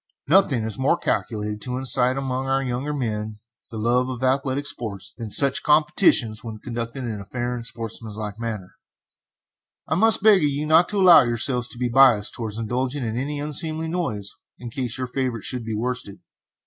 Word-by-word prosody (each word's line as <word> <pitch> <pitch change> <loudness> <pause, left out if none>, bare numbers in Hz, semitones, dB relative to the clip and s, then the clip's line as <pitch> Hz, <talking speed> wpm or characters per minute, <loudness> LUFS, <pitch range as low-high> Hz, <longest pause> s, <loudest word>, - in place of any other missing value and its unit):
Nothing 145 - +3
is 110 0 -4
more 140 +6 +2
calculated 105 -2 -2
to 125 +2 -3
incite 130 0 +3
among 135 -1 -3
our 135 0 +1
younger 130 +3 -3
men 110 -6 -3 0.3
the 115 - -8
love 120 +3 +1
for 130 0 -3
athletic 135 +1 0
sports 105 -8 -6
than 115 -3 -7
such 140 +5 +3
competitions, 150 - +3
when 110 -2 -7
conducted 115 +3 -5
in 110 -4 -4
a - - -8
fair 120 +4 -4
and 120 -1 -5
sportsmanlike 110 -2 -6
manner. 110 -6 -5 1.1
I - - -1
must 215 +4 +3
beg 210 -3 +7
of 150 - +2
you 145 +2 -3
not 160 +3 +4
to 205 - -1
allow 180 -3 +8
yourselves 120 +1 0
to - - -8
be 125 0 -1
biased 120 -4 +4
towards 110 -2 -5
indulging 125 +4 -2
in 110 0 -3
any 145 +4 -3
unseemly 155 +2 -1
noise 110 - -3 0.2
in 120 -1 -8
case 125 -2 -3
your 130 - -2
favorite 125 -3 -3
should 125 -2 -2
be 110 -1 -4
worsted. 120 -3 -4
125 Hz, 185 wpm, -23 LUFS, 115-140 Hz, 1.1 s, allow